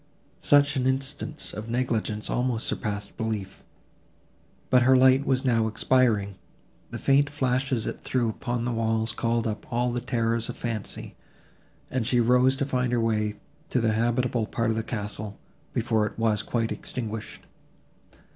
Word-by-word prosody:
Such 145 0 +4
an 130 0 +1
instance 135 +3 -2
of 105 +2 -6
negligence 115 -3 -1
almost 125 -2 0
surpassed 105 -2 -3
belief. 110 -4 -4 1.1
But 125 -1 +6
her 130 +2 +6
light 130 +2 +5
was 130 0 +1
now 115 -3 +3
expiring; 110 -4 +2 0.5
the - - -5
faint 140 +1 +3
flashes 130 -4 0
it - - -4
threw 125 -2 0
upon 120 +1 -2
the 125 - 0
walls 115 -1 0
called 115 +1 0
up 110 -1 -4
all 120 +1 +1
the 120 0 -2
terrors 115 -2 0
of - - -5
fancy, 115 -4 -5 0.8
and 125 -4 -1
she 125 - +3
rose 125 +3 +4
to 140 - -1
find 125 -2 0
her 120 - +2
way 110 -2 0 0.3
to 125 - +1
the 115 -2 +2
habitable 120 0 +1
part 115 -1 0
of - - -1
the 115 - 0
castle, 105 -2 -5 0.3
before 110 -2 +1
it - - -9
was 110 -2 +2
quite 115 +1 -1
extinguished. 110 -3 -5
115 Hz, 155 wpm, -26 LUFS, 110-130 Hz, 1.1 s, But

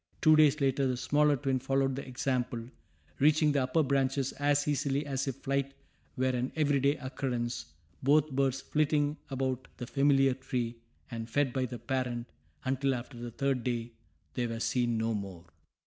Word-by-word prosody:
Two 155 0 +6
days 155 -1 +5
later 135 -1 +2
the 125 -1 -1
smaller 145 +3 +3
twin 135 0 0
followed 135 0 +1
the 140 - -4
example, 125 -2 -1 0.6
reaching 150 +1 +4
the 140 -1 +2
upper 130 +5 +2
branches 135 -1 +1
as 145 0 +1
easily 145 0 0
as 135 -1 -2
if 135 - -2
flight 140 0 -2 0.4
were 130 - +1
an 125 0 -1
every 145 -3 +2
day 140 +2 +3
occurrence, 125 - -3 0.3
both 150 +2 +3
birds 135 -1 +1
flitting 150 0 +1
about 130 -1 -2
the 125 - -5
familiar 135 0 +3
tree, 125 -3 -3 0.3
and 115 -1 -5
fed 135 +1 +1
by 130 -1 0
the 120 0 -6
parent, 120 0 -2 0.4
until 135 +1 +1
after 120 +2 -7
the 120 0 -5
third 135 +1 -1
day, 120 -2 -2 0.4
they 125 -2 -1
were 115 0 -4
seen 120 0 +1
no 115 +1 0
more. 95 -5 -6
135 Hz, 170 wpm, -31 LUFS, 125-140 Hz, 0.6 s, Two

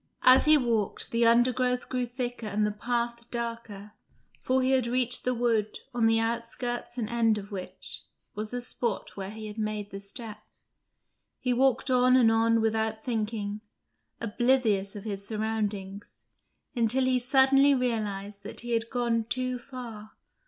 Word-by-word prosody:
As 255 +1 +7
he 305 0 +7
walked, 230 -6 -1
the 230 0 +3
undergrowth 250 +1 +2
grew 250 -1 -2
thicker 245 -2 -4
and 210 +1 0
the 210 - 0
path 235 +2 -3
darker, 230 -4 -5 0.5
for 260 0 +1
he 260 - +2
had 260 -3 +2
reached 245 0 +1
the 250 - +2
wood, 230 -3 0 0.2
on 235 -2 +3
the 225 0 +3
outskirts 235 +2 -3
and 230 -3 -1
end 225 -1 +2
of 205 0 -8
which 190 -2 -5 0.3
was 215 +1 -5
the 245 +1 -4
spot 235 -3 -3
where 195 -1 -5
he 220 +1 -8
had 210 +1 -7
made 215 -1 -3
the 195 - -6
steps. 210 +1 -7 0.8
He 250 -1 0
walked 265 +1 +2
on 255 0 +5
and 235 -3 +5
on 225 0 +3
without 220 0 0
thinking, 215 -3 -2 0.6
oblivious 225 -4 +1
of 205 - -7
his 200 -2 -5
surroundings, 210 -3 -4 0.5
until 245 +2 +2
he 255 -1 +2
suddenly 270 +2 +5
realised 210 -5 -2
that - - -7
he 240 0 -6
had 230 0 +1
gone 235 -2 0
too 255 +1 -2
far. 235 -5 -9
230 Hz, 160 wpm, -28 LUFS, 215-250 Hz, 0.8 s, As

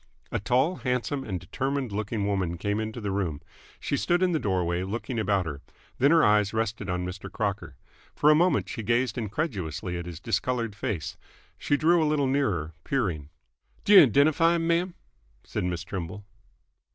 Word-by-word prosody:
A - - -1
tall, 130 - +1
handsome, 130 +1 -1
and 95 -8 -4
determined 135 +6 -3
looking 105 0 -2
woman 95 -4 -1
came 105 +4 -1
into 110 +2 -4
the 105 -3 -3
room. 90 -7 -2 0.4
She - - -1
stood 175 +5 +1
in 185 - +3
the 160 - +1
doorway, 90 -5 0
looking 115 +5 -3
about 100 -3 +1
her. 75 -3 -6 0.4
Then 140 - +5
her 165 0 +5
eyes 105 0 +3
rested 110 -2 -2
on 90 0 -1
Mr. 90 +1 -7
Crocker. 100 -9 -3 0.4
For 150 - +5
a - - +8
moment 175 +4 +3
she 115 - -5
gazed 120 +2 +1
incredulously 95 - -3
at 85 - -7
his 85 -2 -7
discoloured 115 +1 -1
face. 100 -5 -4 0.4
She 145 - +1
drew 165 +3 +4
a 155 - +2
little 150 -2 +2
nearer, 105 - 0
peering. 90 - -1 0.6
"D'yo 200 -8 +9
'dentify 155 +7 +4
'm, 165 -1 -1
ma'am?" 170 +2 +1 0.5
said - - -3
Miss 90 -1 -2
Trimble. 95 +1 -6
110 Hz, 175 wpm, -27 LUFS, 95-140 Hz, 0.6 s, D'yo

